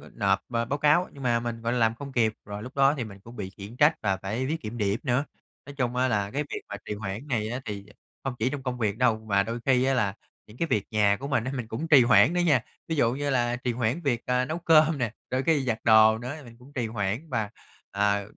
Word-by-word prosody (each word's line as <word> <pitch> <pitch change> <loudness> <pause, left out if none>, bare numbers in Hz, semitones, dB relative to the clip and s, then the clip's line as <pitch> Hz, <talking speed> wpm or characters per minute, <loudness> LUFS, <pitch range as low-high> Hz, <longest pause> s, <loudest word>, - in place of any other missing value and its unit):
nộp - - +2
b - - -15
báo 115 +4 0
cáo, 150 +5 +3
nhưng 140 - -10
mà 120 -2 +2
mình, 115 -1 -5
gọi 115 +1 -1
là, 125 - 0
làm 115 -1 +3
không 140 +3 -8
kịp, 115 -4 +2
rồi 105 +1 -6
lúc 125 - -10
đó 135 0 +5
thì 125 - -2
mình 100 -3 -10
cũng 115 +5 -13
bị 100 -4 -5
khiển 100 +4 -11
trách 150 +3 +5
và 100 -3 0
phải 105 +7 -3
viết 160 +4 -2
kiểm 115 -1 -6
điểm 105 0 0
nữa. 125 +2 +1 0.4
Nói 140 - -9
chung 125 -2 -1
á 130 +1 +2
là 105 -4 0
cái 145 +5 -1
việc - - -4
mà 100 - -4
trì - - -3
hoãn 105 +6 -6
này 110 -5 -1
á 125 +2 -3
thì 100 -2 -6 0.4
không 135 - -2
chỉ 115 +4 +1
trong 140 -1 -5
công 125 -1 -3
việc 110 -3 -1
đâu, 120 -3 +3
mà 100 -3 +1
đôi 115 +3 -4
khi 130 -2 +4
á 135 +1 +2
là 105 -7 +1 0.3
những 105 +2 -15
cái 165 - 0
việc 105 -9 0
nhà 105 -2 +3
của 140 - -5
mình 140 -6 +1
á, 130 - -3
mình 125 -4 -4
cũng 130 +9 -4
trì 145 -6 +7
hoãn 125 +6 +5
đó 180 - +1
nha. 155 -8 +3 0.3
Ví 160 - -1
dụ 120 -5 +2
như 145 +2 -2
là 120 -2 +1
trì 125 0 -2
hoãn 120 +6 -1
việc, 125 -7 0
ờ, 125 0 +1
nấu 155 +5 -3
cơm 160 -2 +4
nè, 120 -5 -1 0.2
đôi 130 +1 0
khi 145 -2 +2
giặt 115 -3 -1
đồ 110 -1 +6
nữa 125 +4 -5
thì 150 - -12
mình 115 -2 -14
cũng 130 +4 -17
trì 125 -4 -2
hoãn 110 +7 -3
và, 110 -5 -1 0.4
à, 100 0 +1
120 Hz, 280 wpm, -27 LUFS, 110-135 Hz, 0.4 s, trì